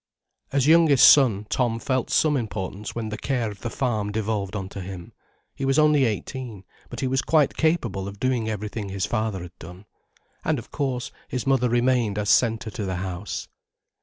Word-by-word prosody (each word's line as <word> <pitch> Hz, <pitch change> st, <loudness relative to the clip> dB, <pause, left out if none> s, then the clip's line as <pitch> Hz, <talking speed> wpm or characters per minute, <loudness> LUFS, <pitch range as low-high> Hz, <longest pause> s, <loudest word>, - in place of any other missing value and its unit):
As 140 Hz, -2 st, +2 dB
youngest 155 Hz, -4 st, +6 dB
son, 115 Hz, -8 st, +5 dB
Tom 120 Hz, -3 st, +1 dB
felt 130 Hz, +2 st, -1 dB
some 155 Hz, -2 st, +3 dB
importance 105 Hz, -4 st, -4 dB
when 115 Hz, -2 st, -3 dB
the 105 Hz, 0 st, -5 dB
care 125 Hz, -5 st, -1 dB
of 100 Hz, -, -13 dB
the 120 Hz, -, -3 dB
farm 110 Hz, -5 st, -1 dB
devolved 105 Hz, -2 st, -2 dB
on 95 Hz, -2 st, -3 dB
to 100 Hz, -, -7 dB
him. 90 Hz, -2 st, -8 dB, 0.4 s
He -, -, -7 dB
was 135 Hz, +1 st, +2 dB
only 150 Hz, -3 st, +5 dB
eighteen, 115 Hz, -1 st, -4 dB, 0.3 s
but -, -, -6 dB
he 130 Hz, -, 0 dB
was 135 Hz, +1 st, +1 dB
quite 155 Hz, -4 st, +2 dB
capable 120 Hz, -, 0 dB
of 100 Hz, 0 st, -9 dB
doing 125 Hz, -4 st, 0 dB
everything 105 Hz, -1 st, -4 dB
his 95 Hz, -1 st, -2 dB
father 110 Hz, -5 st, -2 dB
had 90 Hz, 0 st, -13 dB
done. 90 Hz, +4 st, -11 dB, 0.6 s
And 155 Hz, -, +1 dB
of 120 Hz, +5 st, -9 dB
course, 130 Hz, -4 st, -2 dB, 0.2 s
his 125 Hz, -, -4 dB
mother 130 Hz, -2 st, +2 dB
remained 120 Hz, -3 st, +1 dB
as 105 Hz, 0 st, +1 dB
centre 115 Hz, -2 st, +2 dB
to 105 Hz, -, -5 dB
the 95 Hz, -1 st, -2 dB
house. 95 Hz, +2 st, -5 dB
115 Hz, 190 wpm, -24 LUFS, 100-130 Hz, 0.6 s, youngest